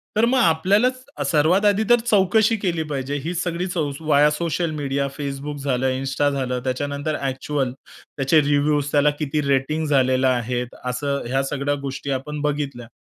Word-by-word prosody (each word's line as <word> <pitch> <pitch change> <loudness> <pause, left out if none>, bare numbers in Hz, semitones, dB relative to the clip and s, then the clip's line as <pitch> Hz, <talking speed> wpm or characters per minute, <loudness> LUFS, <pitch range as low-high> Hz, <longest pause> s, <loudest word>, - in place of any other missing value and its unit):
तर 220 +2 +4
मग 255 +2 +2
आपल्यालाच 210 +8 +2 0.3
सर्वात 165 +7 +3
आधी 205 +1 +3
तर 240 0 +6
चौकशी 220 +2 +3
केली 175 -5 -1
पाहिजे, 140 0 -3
ही 170 - -3
सगळीच 175 +1 -2 0.3
व्हाया 150 -2 +4
सोशल 165 +1 -1
मीडिया, 140 -1 -1
Facebook 140 +1 -4
झालं, 130 -1 0
इन्स्टा 135 +2 0
झालं, 130 -3 -2
त्याच्यानंतर 145 +3 -2
ॲक्च्युअल. 135 0 -2 0.5
त्याचे 135 +3 +4
रिव्ह्यूज, 145 0 +1
त्याला 145 0 +4
किती 150 0 -1
रेटिंग 140 +3 +1
झालेल्या 130 -2 +3
आहेत, 125 +1 -3
असं 140 +3 -2
ह्या 135 +2 0
सगळ्या 145 0 -1
गोष्टी 135 0 -4
आपण 145 +3 -3
बघितल्या. 140 -5 -3
145 Hz, 150 wpm, -22 LUFS, 135-160 Hz, 0.5 s, तर